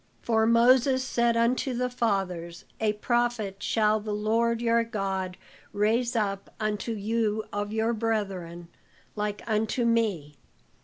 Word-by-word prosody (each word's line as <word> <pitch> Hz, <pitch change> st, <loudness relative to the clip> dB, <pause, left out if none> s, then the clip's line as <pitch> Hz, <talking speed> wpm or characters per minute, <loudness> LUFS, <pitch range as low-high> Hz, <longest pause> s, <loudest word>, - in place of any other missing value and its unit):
For 220 Hz, -1 st, +2 dB
Moses 255 Hz, +3 st, +4 dB
said 235 Hz, -2 st, +1 dB
unto 245 Hz, +2 st, +1 dB
the 250 Hz, +1 st, 0 dB
fathers, 195 Hz, -8 st, -2 dB
'A 215 Hz, -1 st, +1 dB
prophet 225 Hz, -3 st, -1 dB
shall 215 Hz, 0 st, +2 dB
the 210 Hz, 0 st, -4 dB
Lord 225 Hz, +2 st, +1 dB
your 230 Hz, 0 st, +2 dB
God 195 Hz, -5 st, -3 dB, 0.4 s
raise 230 Hz, +4 st, +1 dB
up 200 Hz, -3 st, -2 dB
unto 215 Hz, +1 st, -2 dB
you 220 Hz, 0 st, -1 dB
of 205 Hz, 0 st, -2 dB
your 220 Hz, +2 st, 0 dB
brethren, 195 Hz, -7 st, -3 dB, 0.5 s
like 210 Hz, -1 st, -3 dB
unto 220 Hz, +2 st, 0 dB
me. 200 Hz, -11 st, 0 dB
220 Hz, 125 wpm, -27 LUFS, 205-235 Hz, 0.5 s, Moses